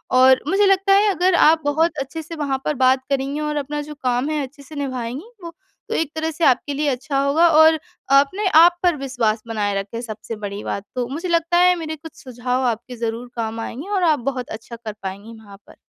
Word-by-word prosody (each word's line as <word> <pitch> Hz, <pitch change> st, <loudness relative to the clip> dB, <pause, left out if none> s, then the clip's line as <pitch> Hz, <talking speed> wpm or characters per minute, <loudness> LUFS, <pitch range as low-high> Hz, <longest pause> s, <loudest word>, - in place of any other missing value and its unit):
और 260 Hz, 0 st, +6 dB
मुझे 395 Hz, +4 st, +3 dB
लगता 390 Hz, 0 st, +3 dB
है 405 Hz, +2 st, +5 dB
अगर 365 Hz, +1 st, +2 dB
आप 320 Hz, 0 st, +5 dB
बहुत 315 Hz, +4 st, +1 dB
अच्छे 275 Hz, +4 st, -5 dB
से 330 Hz, +2 st, -9 dB
वहाँ 275 Hz, -3 st, -2 dB
पर 300 Hz, -, +1 dB
बात 260 Hz, 0 st, +3 dB
करेंगी 275 Hz, +1 st, -1 dB
और 300 Hz, 0 st, -2 dB
अपना 295 Hz, +1 st, -3 dB
जो 300 Hz, +1 st, -8 dB
काम 250 Hz, +3 st, 0 dB
है 305 Hz, -1 st, -1 dB
अच्छे 280 Hz, +2 st, -11 dB
से 305 Hz, +3 st, -13 dB
निभाएँगी 260 Hz, -1 st, -4 dB, 0.2 s
वो, 335 Hz, 0 st, -8 dB, 0.4 s
तो -, -, -2 dB
एक 320 Hz, -2 st, -1 dB
तरह 320 Hz, +1 st, -2 dB
से 320 Hz, +2 st, -5 dB
आपके 270 Hz, +2 st, +2 dB
लिए 295 Hz, +1 st, -1 dB
अच्छा 275 Hz, +2 st, -2 dB
होगा 315 Hz, +5 st, +4 dB
और 315 Hz, 0 st, +6 dB, 0.4 s
अपने 375 Hz, +9 st, 0 dB
आप 345 Hz, +1 st, +6 dB
पर 350 Hz, -2 st, +3 dB
विश्वास 245 Hz, -5 st, -1 dB
बनाए 210 Hz, -3 st, -1 dB
रखें 205 Hz, +4 st, -6 dB
सबसे 225 Hz, -1 st, -7 dB
बड़ी 200 Hz, +1 st, -6 dB
बात 200 Hz, -, -4 dB
तो। 250 Hz, -1 st, -1 dB
मुझे 330 Hz, +6 st, -4 dB
लगता 335 Hz, 0 st, +2 dB
है 360 Hz, 0 st, +5 dB
मेरे 315 Hz, -1 st, -4 dB
कुछ 315 Hz, 0 st, -13 dB
सुझाव 250 Hz, 0 st, -2 dB
आपके 235 Hz, +2 st, -3 dB
ज़रूर 230 Hz, +1 st, -4 dB
काम 225 Hz, -1 st, -3 dB
आएँगे 280 Hz, -, -7 dB
और 375 Hz, -, +1 dB
आप 315 Hz, -3 st, +3 dB
बहुत 255 Hz, -2 st, -6 dB
अच्छा 225 Hz, +2 st, -8 dB
कर 225 Hz, -2 st, -7 dB
पाएँगी 200 Hz, +4 st, -7 dB
वहाँ 200 Hz, -2 st, -14 dB
पर। -, -, -16 dB
280 Hz, 225 wpm, -21 LUFS, 245-320 Hz, 0.4 s, और